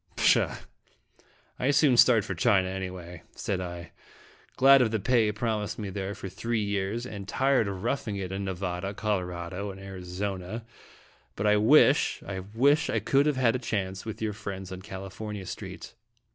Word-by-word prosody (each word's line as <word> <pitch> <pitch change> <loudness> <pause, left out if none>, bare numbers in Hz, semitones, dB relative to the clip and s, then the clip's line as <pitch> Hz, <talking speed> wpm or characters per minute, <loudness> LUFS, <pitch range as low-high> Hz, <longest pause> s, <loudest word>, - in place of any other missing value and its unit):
" - - -32
Pshaw! - - +3 1.0
I 130 - +1
soon 140 -2 +4
start 120 -2 +6
for - - -3
China, 100 -7 +3
anyway," 90 -3 -6
said 95 -2 -2
I 85 -1 -7 0.6
"glad 135 +1 +7
of 120 - +3
the 110 0 -1
pay 110 0 +3
promised 105 -1 -2
me 105 -3 -5
there 100 +1 -4
for - - -7
three 115 +4 -2
years, 100 +3 -2
and 100 -5 -7
tired 130 -1 +2
of 95 -1 -5
roughing 120 -3 -1
it 95 -2 -4
in 95 +1 -3
Nevada, 95 +1 -3
Colorado, 90 -2 -3
and 95 0 -8
Arizona; 95 +2 -5 0.7
but 100 - -2
I 105 0 +5
wish 135 +6 +4
I 95 -1 -4
wish 135 +11 +2
I - - +1
could 135 +8 +2
have 150 -3 +1
had 125 -2 +3
a - - -1
chance 95 -5 -3
with 110 0 -6
your 105 -1 -1
friends 95 -2 -7
on 95 0 -7
California 95 +1 -7
street." - - -8
100 Hz, 175 wpm, -28 LUFS, 95-115 Hz, 1.0 s, glad